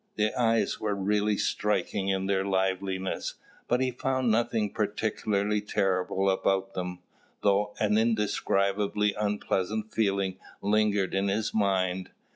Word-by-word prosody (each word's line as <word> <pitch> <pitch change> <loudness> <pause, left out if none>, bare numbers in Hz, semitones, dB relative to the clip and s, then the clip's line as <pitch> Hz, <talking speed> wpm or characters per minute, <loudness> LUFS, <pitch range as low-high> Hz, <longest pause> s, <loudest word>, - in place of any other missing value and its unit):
The 110 0 +1
eyes 115 -2 +1
were 105 -1 -1
really 105 +1 +1
striking 105 -2 0
in 95 0 0
their 95 -1 +1
liveliness, 95 0 -1 0.3
but 125 +1 +2
he 130 -1 +1
found 130 -1 0
nothing 115 -2 +1
particularly 105 0 0
terrible 95 -1 0
about 95 0 +1
them, 90 -1 -5 0.4
though 105 +1 +2
an 105 0 +3
indescribably 105 -2 +1
unpleasant 105 0 -1
feeling 100 -3 0 0.2
lingered 105 -1 +1
in 95 +1 +1
his 105 +2 -1
mind. 95 -3 +1
100 Hz, 120 wpm, -28 LUFS, 95-105 Hz, 0.4 s, an